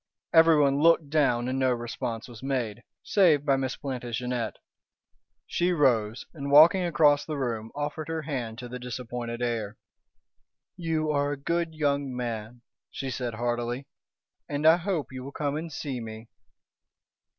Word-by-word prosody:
Everyone 155 -4 +5
looked 165 -3 +4
down 125 -6 +2
and 130 +1 -1
no 130 -1 +3
response 120 -1 -4
was 120 -3 -12
made, 125 -5 -2 0.2
save 165 -8 +4
by 140 -2 +4
Miss 135 -1 -2
Plantagenet. 125 -3 -3 0.9
She 175 +1 0
rose, 120 -7 +2
and 140 -4 -5
walking 160 +6 +7
across 150 -4 +4
the 155 -2 -4
room, 115 -4 -3
offered 150 +1 -3
her 165 -1 -3
hand 125 -7 -4
to 125 - -7
the 125 +1 -7
disappointed 120 -1 -5
heir. 115 -3 -2 1.0
"You 160 -3 -1
are 145 0 +1
a - - -5
good 165 +3 -2
young 140 -3 0
man," 120 -1 -5 0.3
she 135 -1 -5
said 120 -1 -3
heartily. 120 +2 -2 0.6
"And 145 +1 -2
I 160 +2 +8
hope 175 -6 -2
you 130 -1 -7
will 140 - -7
come 145 -1 -2
and 160 +1 -4
see 135 -3 -4
me." 110 0 -9
135 Hz, 150 wpm, -27 LUFS, 120-150 Hz, 1.0 s, I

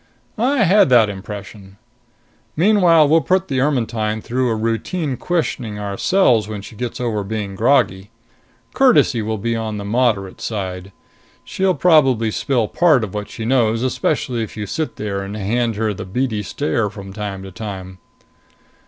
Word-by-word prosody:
"I 255 +1 +2
had 195 -3 +5
that 115 -4 +5
impression. 100 0 -9 0.8
Meanwhile, 175 -4 +5
we'll 160 +2 +4
put 185 +5 0
the 130 -2 0
Ermetyne 115 -6 0
through 125 +3 -1
a 115 - 0
routine 120 +7 -2
questioning 125 -9 -2
ourselves 105 - +2
when 105 -2 -6
she 110 - -11
gets 120 +2 -5
over 115 -4 -1
being 100 -1 -4
groggy. 105 -4 +1 0.6
Courtesy 250 - +4
will 110 +1 -2
be 115 +3 -2
on 110 -2 -3
the 100 - -6
moderate 105 -4 0
side. 95 -3 -4 0.5
She'll 190 -1 0
probably 135 -10 +3
spill 120 -1 0
part 155 -6 +3
of 100 - -5
what 105 -1 -5
she 110 - -6
knows, 115 -2 +2
especially 130 -1 -1
if 110 -1 -6
you 105 - -3
sit 155 - -3
there 100 -2 -3
and 100 +2 -6
hand 115 +3 -1
her 110 0 -1
the - - -7
beady 110 +2 -2
stare 110 0 -1
from 100 -1 -10
time 100 -2 -5
to 95 - -9
time." 95 -2 -7
115 Hz, 160 wpm, -19 LUFS, 105-135 Hz, 0.8 s, had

